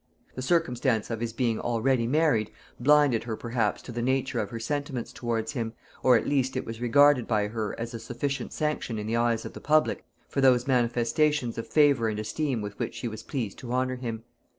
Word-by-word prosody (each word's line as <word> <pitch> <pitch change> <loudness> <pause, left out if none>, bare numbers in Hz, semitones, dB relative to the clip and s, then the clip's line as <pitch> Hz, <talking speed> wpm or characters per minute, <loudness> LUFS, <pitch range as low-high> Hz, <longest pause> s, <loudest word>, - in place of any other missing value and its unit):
The 130 - -5
circumstance 130 -7 +1
of 115 - -2
his 115 0 -2
being 115 -1 0
already 120 0 +1
married, 145 -6 +2 0.3
blinded 145 -3 +4
her 115 -2 -3
perhaps 115 -2 -1
to - - -8
the 120 0 -3
nature 130 0 0
of 105 - -2
her 115 - -6
sentiments 135 0 -3
towards 115 -2 -2
him, 115 -5 -3 0.3
or 125 -2 +6
at - - -2
least 130 -2 0
it - - -3
was 115 +1 -7
regarded 140 +1 +5
by 105 -2 +1
her 110 -1 -4
as 115 +1 -4
a 115 - -5
sufficient 130 +5 -3
sanction 150 -7 -2
in 105 - -4
the 110 +2 -1
eyes 115 -1 +1
of - - -7
the - - -9
public 155 +1 +2 0.2
for 140 - -1
those 125 -2 +5
manifestations 125 +2 +1
of 115 - -5
favor 145 -6 +4
and 105 - -3
esteem 115 +2 -2
with 100 0 -7
which - - -3
she 115 +1 -4
was 110 -1 -6
pleased 115 -6 -4
to 120 -2 -7
honor 130 0 0
him. 115 -3 -5
120 Hz, 210 wpm, -27 LUFS, 115-135 Hz, 0.3 s, or